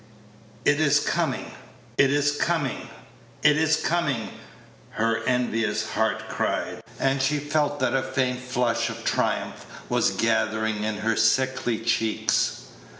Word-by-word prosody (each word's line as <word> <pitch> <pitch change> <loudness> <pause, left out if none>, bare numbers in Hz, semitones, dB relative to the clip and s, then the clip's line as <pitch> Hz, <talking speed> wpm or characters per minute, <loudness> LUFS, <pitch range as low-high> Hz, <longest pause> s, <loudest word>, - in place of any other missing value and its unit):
"It 145 - +4
is 145 -2 +4
coming - - -1 0.4
it 140 - +4
is 145 0 +2
coming 145 -5 -1 0.5
it 150 -1 +6
is 160 0 +3
coming!" 150 -10 -1 0.6
her 115 +1 0
envious 115 -4 0
heart - - 0
cried, - - -2 0.2
and 135 0 +1
she 140 +3 +2
felt 145 0 0
that 130 -1 +1
a 135 - +2
faint 130 -1 -1
flush 125 -2 0
of - - -7
triumph - - -1 0.3
was - - +3
gathering 110 -1 0
in 110 0 -1
her 110 +1 0
sickly 120 +1 +2
cheeks. 115 -1 0
130 Hz, 130 wpm, -25 LUFS, 115-145 Hz, 0.6 s, it